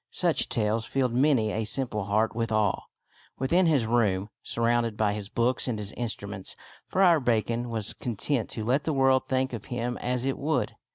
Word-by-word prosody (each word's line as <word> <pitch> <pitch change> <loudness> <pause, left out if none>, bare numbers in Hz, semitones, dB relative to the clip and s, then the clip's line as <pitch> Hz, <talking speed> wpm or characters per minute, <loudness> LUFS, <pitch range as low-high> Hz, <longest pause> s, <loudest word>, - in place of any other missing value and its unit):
Such - - +1
tales 110 0 0
filled 130 -2 0
many 125 -4 +3
a 110 - -1
simple 105 -2 -1
heart 110 +2 +1
with 115 -1 -1
awe. 105 -2 +1 0.5
Within 170 +7 +2
his 145 -8 +3
room, 105 -3 +1
surrounded 115 -1 0
by 105 -1 +2
his 105 -1 -6
books 120 +4 +1
and 120 -3 -1
his 105 -1 -3
instruments, 105 -5 -4 0.3
Friar 180 -4 +4
Bacon 120 -1 0
was 110 -3 -2
content 120 +2 -1
to 110 - -4
let 130 +5 +1
the 160 - 0
world 135 -1 +3
think 130 0 0
of 110 -4 -6
him 120 0 -3
as 125 0 -1
it 135 - -1
would. 140 -6 -1
120 Hz, 180 wpm, -27 LUFS, 110-130 Hz, 0.5 s, Friar